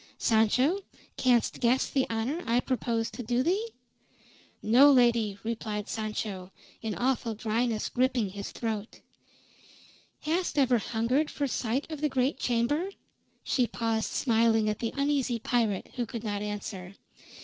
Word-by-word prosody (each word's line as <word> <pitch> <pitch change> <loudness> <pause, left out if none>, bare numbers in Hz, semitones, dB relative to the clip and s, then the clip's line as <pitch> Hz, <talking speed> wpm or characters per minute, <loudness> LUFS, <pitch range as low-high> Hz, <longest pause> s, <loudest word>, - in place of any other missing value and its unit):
Sancho, 250 - +3 0.4
canst 245 -3 +2
guess 245 +2 +2
the 265 -2 0
honor 230 +9 -2
I 235 +2 +3
propose 235 -3 -1
to - - -6
do 245 +2 0
thee?" 390 +8 +1 1.0
"No, 255 +7 +7
lady," 235 -6 +3
replied 215 -2 -3
Sancho, 210 -4 -4 0.3
an 220 -2 -3
awful 245 -3 0
dryness 225 +1 -1
gripping 250 -4 +1
his 200 0 -6
throat. 220 -2 -4 1.2
"Hast 335 +1 -1
ever 255 -4 +4
hungered 240 +8 0
for 285 - -2
sight 255 0 -1
of 305 -2 -5
the 300 - +2
great 260 +1 0
chamber?" 250 +10 0 0.5
She 250 -3 +1
paused 225 -1 -1
smiling 225 -3 +2
at 210 - -2
the 230 - -2
uneasy 280 -4 +1
pirate, 225 -4 -1
who 240 -2 -1
could 230 -3 -6
not 205 -2 -2
answer. 200 -2 -5
235 Hz, 140 wpm, -28 LUFS, 220-260 Hz, 1.2 s, No